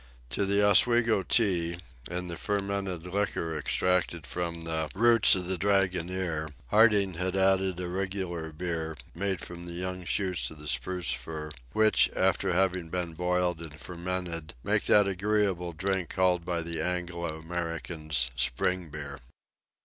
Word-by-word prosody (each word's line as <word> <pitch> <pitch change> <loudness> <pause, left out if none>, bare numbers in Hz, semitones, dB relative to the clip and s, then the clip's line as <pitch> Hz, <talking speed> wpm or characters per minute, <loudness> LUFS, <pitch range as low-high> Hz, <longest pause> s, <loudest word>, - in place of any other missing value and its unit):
To 100 - 0
the 100 +1 +3
Oswego 115 +1 +5
tea, 85 -4 +3 0.3
and 90 +1 -3
the 85 - -4
fermented 100 -2 -2
liquor 90 -4 -2
extracted 85 +1 0
from 85 +3 -4
the 80 -1 -2
roots 115 0 +6
of 90 -1 -2
the 90 0 0
dragonnier, 90 -4 0 0.2
Harding 105 -3 +5
had 95 +1 -1
added 95 -1 +2
a 90 - -3
regular 90 -3 -3
beer, 80 -1 -3 0.2
made 95 -1 -1
from 85 0 -9
the 85 - -3
young 90 +1 -3
shoots 95 -1 0
of 80 - -12
the 75 0 -9
spruce 80 +8 0
fir, 75 -1 -6 0.2
which, 110 0 +4
after - - +2
having 90 -2 +1
been 85 -1 -3
boiled 90 0 0
and 75 -2 -9
fermented, 85 -3 -4
made - - +1
that 105 -1 +5
agreeable 95 -2 0
drink 95 +1 -2
called 90 -2 +1
by 85 -1 -2
the 80 -1 -3
Anglo 85 -2 -2
Americans 80 -5 -3
spring 90 +9 0
beer. 70 -1 -7
90 Hz, 145 wpm, -28 LUFS, 85-95 Hz, 0.3 s, roots